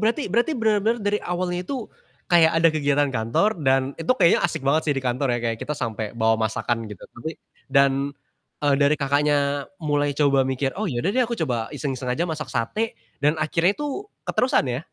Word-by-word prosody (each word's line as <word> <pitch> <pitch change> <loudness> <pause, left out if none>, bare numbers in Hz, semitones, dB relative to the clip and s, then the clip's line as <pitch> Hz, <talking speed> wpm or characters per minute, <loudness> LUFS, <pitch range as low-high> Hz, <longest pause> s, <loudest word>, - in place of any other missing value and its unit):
berarti 230 +7 +1
berarti, 240 +8 +2
bener-bener 220 +1 +1
dari 205 +1 +1
awalnya 180 0 -2
itu, 250 +2 -5 0.4
kayak 165 -2 +6
ada 165 0 +5
kegiatan 145 -2 +1
kantor 125 - 0
dan 135 0 +2
itu 165 - -7
kayaknya 170 - +4
asik 160 -5 -1
banget 150 +4 +3
sih 145 - +3
di 135 - -2
kantor 125 0 0
ya, - - -3
kayak 115 - -4
kita 150 - -3
sampai 110 0 -4
bawa 110 0 +3
masakan 115 0 -2
gitu, 105 -4 -10
tapi 160 +7 -7 0.3
dan, 140 +1 +2 0.5
eee, 145 -1 +4
dari 140 +2 +4
Kakaknya 145 0 +1
mulai 145 -1 0
coba 140 -2 +3
mikir, 135 +1 -1
"Oh, 215 - 0
yaudah 130 +8 -1
deh, 255 - +3
aku 235 - -3
coba 125 - -2
iseng-iseng 130 -3 -4
aja 140 +8 0
masak 155 -3 -4
sate." 130 - -2 0.2
Dan 150 +2 +2
akhirnya 165 +5 +1
itu 295 +8 -4 0.2
keterusan 250 - +1
ya? 125 +5 -3
145 Hz, 190 wpm, -23 LUFS, 135-175 Hz, 0.5 s, kayak